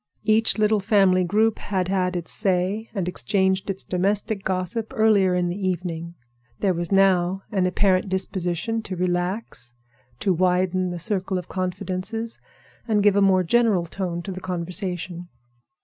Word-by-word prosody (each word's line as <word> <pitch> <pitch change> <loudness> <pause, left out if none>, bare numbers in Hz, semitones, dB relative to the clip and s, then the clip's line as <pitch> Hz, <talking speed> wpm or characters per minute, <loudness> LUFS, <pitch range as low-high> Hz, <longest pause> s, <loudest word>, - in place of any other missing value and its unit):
Each 220 +1 +2
little 215 0 +3
family 195 -3 +3
group 215 +5 +2
had 185 -3 -2
had 185 -1 0
its 175 -2 -4
say 195 +2 0
and 190 -3 -1
exchanged 190 +1 0
its 195 0 -3
domestic 200 +3 -1
gossip 190 +4 -2
earlier 205 -4 +4
in 180 -1 +1
the 190 +2 -2
evening. 170 -2 -3 0.4
There 190 -2 +2
was 175 +1 -4
now 190 -1 +3
an 190 -3 +1
apparent 190 +1 +2
disposition 190 +3 -1
to 195 -3 -6
relax; 175 - -2 0.5
to 190 - +2
widen 185 +1 +1
the 175 - -4
circle 190 +1 -1
of 180 - -5
confidences 185 +5 -3 0.5
and 210 -3 +2
give 205 -1 +5
a 200 - +4
more 190 -2 +4
general 210 -2 +2
tone 175 -1 -4
to 195 - -5
the 185 0 -7
conversation. 180 0 -4
185 Hz, 150 wpm, -23 LUFS, 180-205 Hz, 0.5 s, give